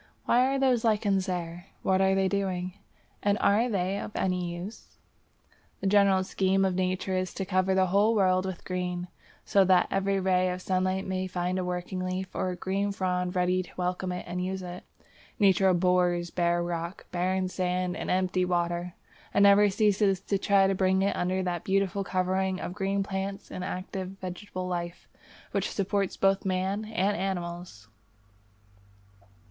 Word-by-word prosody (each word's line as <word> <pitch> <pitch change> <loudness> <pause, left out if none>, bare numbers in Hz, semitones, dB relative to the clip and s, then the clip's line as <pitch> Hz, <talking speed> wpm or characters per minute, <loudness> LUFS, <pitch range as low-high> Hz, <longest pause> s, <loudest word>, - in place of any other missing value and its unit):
Why 250 +2 +4
are 270 +1 0
those 260 -4 +2
lichens 205 -4 +1
there? 175 0 -4 0.2
What 190 0 +2
are 190 0 +3
they 195 0 +2
doing, 185 -2 -2 0.5
and 205 0 +2
are 220 +5 +3
they 195 -1 -1
of - - -5
any 180 -2 -1
use? 185 +6 -9 0.8
The - - -6
general 195 -1 +4
scheme 190 +1 +1
of 190 - +1
Nature 185 +1 -1
is 185 -1 -2
to 195 - -3
cover 185 0 +1
the 190 0 +4
whole 200 +5 +3
world 185 -2 +3
with 185 -2 -6
green, 180 -1 -3 0.4
so 195 - +4
that 185 -1 +4
every 195 0 +1
ray 185 -1 +2
of 180 0 -3
sunlight 185 0 0
may 185 0 -2
find 180 0 -2
a - - -1
working 180 +1 -3
leaf 185 +1 -3
or 185 -1 -2
green 195 +3 -1
frond 180 -1 -1
ready 180 0 +2
to 185 - -10
welcome 180 0 -2
it 180 - -5
and 180 +1 -3
use 190 0 -3
it. 180 0 -7 0.5
Nature 195 -2 +4
abhors 180 -1 +2
bare 175 -1 +1
rock, 170 +1 -4
barren 185 +1 0
sand, 180 0 -1
and - - -5
empty 185 0 +1
water, 175 0 -1 0.4
and 200 - +5
never 200 +1 +6
ceases 200 -1 +2
to 200 0 -1
try 200 -1 +4
to 195 - +2
bring 190 0 +2
it 200 - +1
under 185 +1 0
that 175 -2 -2
beautiful 195 0 0
covering 185 0 0
of - - -5
green 195 0 -1
plants 195 0 -5
and 180 - -5
active 185 +1 -5
vegetable 185 0 -6
life 175 -1 -4 0.4
which 200 0 -1
supports 195 -1 -1
both 195 0 +2
man 190 +3 -1
and 205 -2 0
animals. 175 - -4
185 Hz, 170 wpm, -28 LUFS, 180-195 Hz, 0.8 s, never